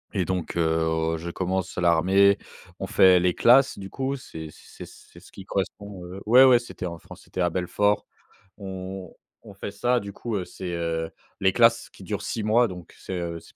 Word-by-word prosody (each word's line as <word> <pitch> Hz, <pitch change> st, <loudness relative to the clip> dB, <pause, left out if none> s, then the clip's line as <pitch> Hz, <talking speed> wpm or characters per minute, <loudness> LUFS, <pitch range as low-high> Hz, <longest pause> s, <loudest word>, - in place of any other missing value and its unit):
et 95 Hz, -3 st, +1 dB
donc 90 Hz, -2 st, -3 dB
heu, 80 Hz, 0 st, +1 dB
je 85 Hz, +2 st, -6 dB
commence 95 Hz, 0 st, -2 dB
l'armée, 95 Hz, +4 st, +4 dB, 0.4 s
on -, -, -3 dB
fait 95 Hz, -1 st, +6 dB
les 90 Hz, 0 st, +2 dB
classes 130 Hz, +7 st, +5 dB
du 95 Hz, 0 st, -8 dB
coup, 135 Hz, +4 st, -2 dB
c'est 80 Hz, -, -9 dB
c -, -, -13 dB
ce -, -, -17 dB
qui 95 Hz, -, -11 dB
correspond 100 Hz, -1 st, -4 dB
heu 95 Hz, +2 st, -9 dB
ouais, 125 Hz, +4 st, +8 dB
ouais, 130 Hz, -2 st, +7 dB
c'était 120 Hz, -5 st, -8 dB
en 85 Hz, -1 st, -5 dB
France, -, -, -14 dB
c'était 95 Hz, -, -5 dB
à 85 Hz, -, +2 dB
Belfort. 100 Hz, +4 st, 0 dB, 0.5 s
On 95 Hz, -2 st, -7 dB, 0.3 s
on 100 Hz, -, -13 dB
fait 100 Hz, -, -6 dB
ça 120 Hz, +4 st, +1 dB
du 100 Hz, -2 st, -8 dB
coup, 115 Hz, +1 st, -5 dB
heu, 90 Hz, -, -3 dB
c'est, 90 Hz, -1 st, -7 dB
heu, 85 Hz, -1 st, -2 dB, 0.3 s
les 95 Hz, -1 st, +2 dB
classes 115 Hz, +1 st, +3 dB
qui -, -, -15 dB
durent 105 Hz, +1 st, -4 dB
6 110 Hz, +1 st, -3 dB
mois, 115 Hz, +3 st, +3 dB
donc 90 Hz, -4 st, -10 dB
c'est, -, -, -7 dB
heu, 85 Hz, -1 st, -4 dB
c'est -, -, -19 dB
95 Hz, 200 wpm, -25 LUFS, 85-105 Hz, 0.5 s, ouais